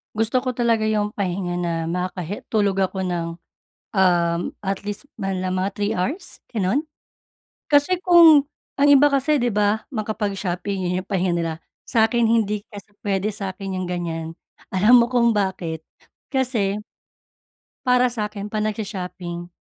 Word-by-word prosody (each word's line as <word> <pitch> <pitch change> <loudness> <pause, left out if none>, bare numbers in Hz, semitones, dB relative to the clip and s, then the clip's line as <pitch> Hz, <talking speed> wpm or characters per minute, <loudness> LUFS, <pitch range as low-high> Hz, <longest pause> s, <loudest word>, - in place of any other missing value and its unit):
Gusto 225 +4 +1
ko 255 - -1
talaga 235 -2 +1
yung 210 -1 0
pahinga 180 -2 -2
na 175 -1 -1
makakahe 180 +2 -3
tulog 200 -3 +2
ako 190 0 -1
ng, 175 -2 -2 0.7
um, 175 -3 +3 0.2
at 195 -1 -3
least 205 +7 -6
manlang 185 -2 -2
mga 185 +2 0
3 205 +2 0
hours? 280 - -4
Ganon. 215 +5 0 0.8
Kasi 290 +5 +4
kung 330 -5 +8 0.3
ang 280 - +4
iba 285 +1 +7
kasi 280 +1 +2
di 245 - +2
ba, 210 +1 +1
makapag-shopping, 200 -4 -3
yun 180 +1 -1
yung 195 - -33
pahinga 185 -2 +1
nila. 165 -1 -1 0.4
Sa'kin 230 +1 +3
hindi 210 -2 +1
kasi 205 0 -12
pwede 200 +1 -1
sakin 195 -2 -4
yung 180 - -3
ganyan. 165 -2 -4 0.3
Alam 215 +6 +6
mo - - +3
kung 235 -2 +3
bakit? 185 -5 -2 0.5
Kasi 240 -7 0 1.1
para 250 0 +4
sakin 210 -2 -4
'pag 215 - -1
nagsho-shopping 180 -5 -5
205 Hz, 140 wpm, -22 LUFS, 185-230 Hz, 1.1 s, kung